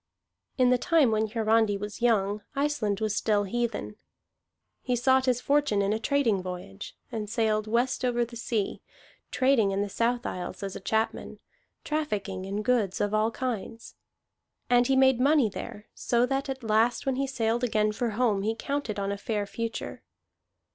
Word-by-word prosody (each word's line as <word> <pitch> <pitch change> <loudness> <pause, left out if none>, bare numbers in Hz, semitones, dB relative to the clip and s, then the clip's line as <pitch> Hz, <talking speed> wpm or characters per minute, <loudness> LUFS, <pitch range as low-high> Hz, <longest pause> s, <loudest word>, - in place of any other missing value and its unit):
In 255 -1 +4
the 250 - +3
time 320 -7 +3
when 220 0 +1
Hiarandi 220 -1 +2
was 205 +2 -7
young, 210 -3 +2
Iceland 275 -8 0
was 215 -1 0
still 210 -2 +1
heathen. 230 0 -3 0.8
He 250 - 0
sought 260 +2 +3
his 250 -1 +2
fortune 280 -9 +2
in 200 +1 +1
a 220 - -1
trading 230 -5 +1
voyage, 180 - -8
and 215 -2 -4
sailed 215 -1 0
West 240 +4 0
over 240 -1 +1
the 235 +1 -12
Sea, 225 -3 -2 0.5
trading 255 -6 +3
in 195 +1 0
the 205 - -4
South 235 +4 0
Isles 185 +2 -5
as 195 -1 -4
a - - -5
chapman, 220 +3 -2 0.5
trafficking 205 -11 -3
in 200 +2 -3
goods 220 -5 +1
of 205 0 0
all 215 +1 +2
kinds. 230 -2 -5 0.8
And 245 0 +5
he 270 - +3
made 265 -2 +4
money 280 -3 +4
there, 205 +1 -8
so 240 0 +1
that 270 +2 -2
at 265 -1 -5
last 225 +2 +2
when 265 -1 0
he 275 0 0
sailed 235 -2 -1
again 215 -3 +2
for 235 +3 -2
home 225 -6 +2
he 220 +3 -1
counted 275 -3 -3
on 200 0 -1
a 200 - -3
fair 210 0 -2
future. 230 +3 -5
225 Hz, 175 wpm, -27 LUFS, 210-250 Hz, 0.8 s, And